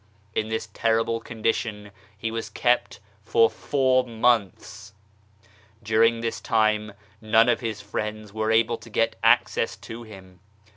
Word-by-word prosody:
In 110 0 -1
this 110 0 -3
terrible 115 0 +1
condition 110 -2 -3 0.3
he 110 +2 -3
was 115 -2 -4
kept 115 -3 0 0.2
for 115 +1 +3
four 130 -2 +1
months. 110 -3 -1 0.9
During 115 +2 +3
this 115 0 -3
time 110 -1 +1 0.3
none 110 +1 +4
of 120 - +2
his 110 -4 -4
friends 105 0 -5
were 110 0 -1
able 115 +1 +2
to 115 +1 -14
get 115 +1 0
access 115 0 +3
to 115 +1 -9
him. 95 -5 -13
110 Hz, 135 wpm, -25 LUFS, 105-115 Hz, 0.9 s, none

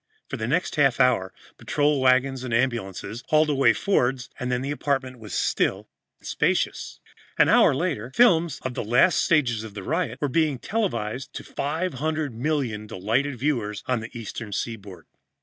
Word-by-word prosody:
For - - -3
the 110 -1 -3
next 165 +5 -1
half 135 -4 +3
hour, 125 -8 +3 0.3
patrol 145 -1 +1
wagons 130 0 +2
and 120 -3 -1
ambulances 115 -2 -2
hauled 155 -1 +3
away 135 -1 +4
Fords, 130 -10 0
and 125 0 -2
then 125 +1 -1
the 140 - -3
apartment 135 -3 -2
was 110 -2 -10
still - - 0 0.3
and - - -22
spacious. - - -1 0.4
An - - +5
hour - - +5
later, 115 +4 -2
films 170 -9 +4
of 130 - -3
the - - -3
last 125 - +3
stages 125 -9 +2
of 110 -2 -10
the 100 - -6
riot 150 - -1
were 145 - 0
being 150 0 +1
televised 130 - -3
to - - -6
500,000,000 145 - -2
delighted 115 +8 -1
viewers 115 -6 -2
on 125 -2 0
the 115 +1 -7
Eastern 115 -1 -7
Seaboard. 100 -6 -5
130 Hz, 165 wpm, -24 LUFS, 115-150 Hz, 0.4 s, An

